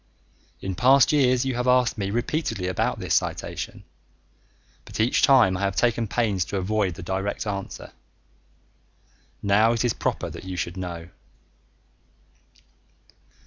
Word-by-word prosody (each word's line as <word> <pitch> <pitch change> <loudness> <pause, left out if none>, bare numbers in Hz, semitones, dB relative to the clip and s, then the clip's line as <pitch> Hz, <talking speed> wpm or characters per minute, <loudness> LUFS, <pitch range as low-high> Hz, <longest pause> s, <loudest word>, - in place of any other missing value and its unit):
In 95 - -3
past 130 +6 +5
years 130 -3 +3
you 130 - -1
have 125 +1 -2
asked 125 -1 +3
me 100 -3 -3
repeatedly 115 - -2
about 95 - -1
this - - -2
citation, - - -2 1.0
but - - -9
each 115 +3 +2
time 130 -10 +5
I - - -3
have 100 -1 -1
taken 115 +2 +1
pains 105 -5 0
to 100 - -4
avoid 95 -2 -1
a 95 - -7
direct 95 +4 -3
answer. 100 -2 -5 1.5
Now 105 +3 +4
it 115 +1 0
is 120 - +1
proper - - -2
that - - -9
you 95 -1 -6
should 85 0 -3
know. 85 -2 -6
105 Hz, 140 wpm, -24 LUFS, 95-125 Hz, 1.5 s, past